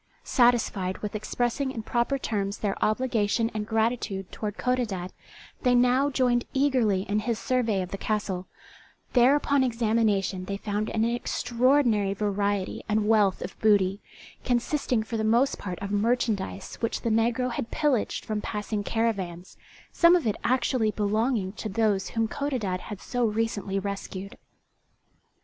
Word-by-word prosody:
Satisfied 230 -7 +2
with 210 - -3
expressing 240 +5 -1
in 230 -4 -5
proper 240 +5 0
terms 200 -5 -2
their 205 -2 -1
obligation 225 -1 +1
and 210 -1 -3
gratitude 220 -4 -1
toward 210 -1 -5
Codadad, 215 -8 -1 0.5
they 250 -2 +3
now 250 +3 +4
joined 250 -3 +2
eagerly 250 -9 +2
in 205 +1 0
his 225 +1 -1
survey 225 -4 0
of 180 - -8
the 195 - -5
castle; 195 -4 -2 0.7
there 250 +3 +6
upon 285 -2 +2
examination 220 -6 +1
they 200 +1 -3
found 210 +1 -2
an 220 0 +1
extraordinary 240 -3 +1
variety 200 -1 -1
and 210 0 +1
wealth 210 -4 +3
of 180 - -7
booty, 200 -2 +3 0.4
consisting 245 -1 0
for 225 +1 -4
the 220 - -1
most 235 +5 +2
part 180 -3 -5
of 200 - -4
merchandise 205 - -1
which 230 - -2
the 230 - -1
negro 240 +3 +1
had 235 -1 -4
pillaged 290 -7 0
from 215 -2 -2
passing 210 0 -3
caravans, 195 -6 -2 0.4
some 340 +1 +6
of 345 - +1
it 215 - +1
actually 240 -2 +1
belonging 215 0 0
to 215 0 -5
those 205 -1 +1
whom 225 -1 0
Codadad 220 -9 -2
had 205 0 -8
so 245 +2 -2
recently 215 -3 -1
rescued. 195 0 -5
220 Hz, 145 wpm, -27 LUFS, 200-245 Hz, 0.7 s, there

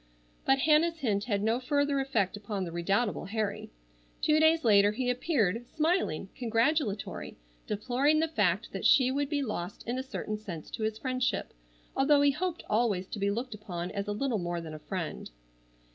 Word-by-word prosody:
But 270 - +4
Hannah's 315 +4 +3
hint 210 -8 0
had 205 -4 0
no 225 +3 +2
further 285 +1 +1
effect 225 -9 0
upon 205 -1 -4
the 170 - -5
redoubtable 195 +6 0
Harry. 210 0 -3 0.5
Two 305 0 +3
days 320 +1 +4
later 205 -1 +5
he 250 +2 0
appeared, 240 - 0
smiling, 310 - 0
congratulatory, 230 -2 -1 0.3
deploring 260 +8 +1
the 325 - +2
fact 205 - 0
that 195 - -5
she 260 -1 +5
would 280 +1 -1
be 290 -2 0
lost 205 -5 -5
in 245 +2 -1
a - - -3
certain 215 -5 -4
sense 175 -8 -8
to - - -6
his 215 0 -1
friendship, 255 0 -1 0.4
although 285 +1 +4
he 285 0 +5
hoped 350 +3 -3
always 210 -4 +1
to 210 - -5
be 200 0 +1
looked 235 +4 -3
upon 180 -4 -5
as 200 0 -3
a - - -1
little 230 +1 -1
more 175 -1 -2
than 160 -2 -7
a 155 - -7
friend. 175 -1 -5
230 Hz, 180 wpm, -30 LUFS, 200-275 Hz, 0.5 s, later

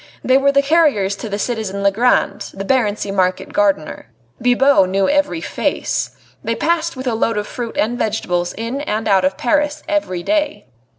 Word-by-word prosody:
They 255 - +3
were 280 0 +3
the 280 0 +3
carriers 280 - +2
to 205 -2 -4
citizen 210 -3 -3
Legrand, 215 +6 +1
the 195 0 -5
Barency 210 -5 0
market 185 0 0
gardener. 195 - 0 0.3
Bibot 245 -4 +4
knew 195 0 +1
every 290 +2 +1
face. - - -2 0.3
They - - -1
passed 335 -1 0
with 260 - -6
a 245 - 0
load 225 0 0
of 210 - -1
fruit 235 0 -6
and 240 +3 0
vegetables 180 -5 -1
in 230 +5 -4
and 220 -6 -2
out 190 -2 +3
of 190 0 0
Paris 295 +4 0
every 240 - -1
day. 305 - -1
225 Hz, 170 wpm, -18 LUFS, 195-280 Hz, 0.3 s, Bibot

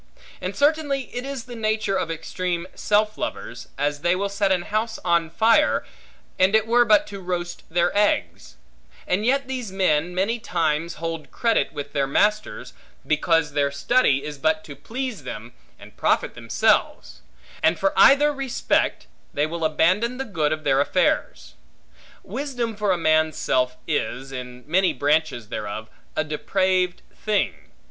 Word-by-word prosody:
And 185 +1 -4
certainly 285 -2 0
it 245 +1 -3
is 275 -3 -5
the 245 0 -10
nature 220 -2 0
of 185 -3 -1
extreme 170 +2 -3
self 215 +1 +1
lovers, 120 +2 -5
as 145 +1 -1
they 175 +3 +2
will 200 +2 -1
set 200 -1 0
an 180 -2 +1
house 220 +4 -2
on 170 -2 +2
fire, 225 +7 +3 0.5
and 190 +3 +4
it 220 0 +3
were 240 +1 +4
but 215 -3 +5
to 200 -1 -8
roast 175 -1 -4
their 175 +2 +1
eggs; 205 - 0 0.5
and 205 +5 0
yet 275 +1 +2
these 250 -6 -4
men 180 -3 +1
many 210 +6 0
times 165 -3 -1
hold 165 -1 -5
credit 230 -1 +1
with 145 -1 -7
their 140 -2 +1
masters, 210 +9 0 0.3
because 155 0 +2
their 140 -1 +2
study 140 - +2
is 150 -2 -7
but 155 +2 +1
to 145 - -10
please 245 - -5
them, 120 -1 -8 0.2
and - - -15
profit - - +1
themselves; - - 0 0.4
and 165 +1 +3
for 195 - +1
either 295 +2 +6
respect, 270 -2 0 0.3
they 145 - +2
will 165 +1 -4
abandon 185 +10 +2
the 270 - -3
good 160 - -1
of 155 0 -2
their 135 -1 +3
affairs. 270 - 0 0.7
Wisdom 245 -5 -3
for 205 -1 0
a 180 - +2
man's 155 -1 +2
self 125 0 0
is, 135 -3 -2
in 125 -1 -8
many 180 +2 +2
branches 145 -5 0
thereof, 105 +1 -5 0.2
a 155 - +1
depraved 180 +4 0
thing. 210 - 0
180 Hz, 155 wpm, -23 LUFS, 150-220 Hz, 0.7 s, either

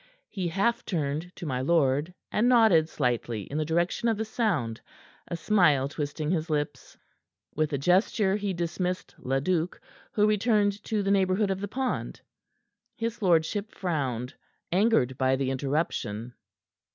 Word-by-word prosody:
He 190 -4 -3
half 200 +7 0
turned 155 0 -2
to 175 - -7
my 130 -4 -1
lord, 145 +1 +2 0.2
and 235 +4 +2
nodded 215 -10 +5
slightly 120 -5 -1
in 145 +9 -4
the 155 - 0
direction 175 +8 +1
of 225 - +1
the 220 - -2
sound, 185 - -1 0.5
a - - -3
smile 160 -8 +3
twisting 150 +1 -3
his 165 -2 -1
lips. 145 -3 -3 0.6
With 155 0 0
a 140 - 0
gesture 190 - +2
he 205 -1 -1
dismissed 180 +1 -3
Leduc, 160 +7 -1 0.3
who 210 - +3
returned 210 -1 +2
to 215 -3 0
the 195 - +1
neighborhood 195 +1 +2
of 190 0 -3
the 205 - -2
pond. 260 +4 -3 0.8
His 230 0 -3
lordship 190 +3 +2
frowned, 135 -9 -2 0.4
angered 180 - +2
by 130 0 +3
the 135 0 -1
interruption. 130 -5 -2
170 Hz, 145 wpm, -27 LUFS, 140-205 Hz, 0.8 s, nodded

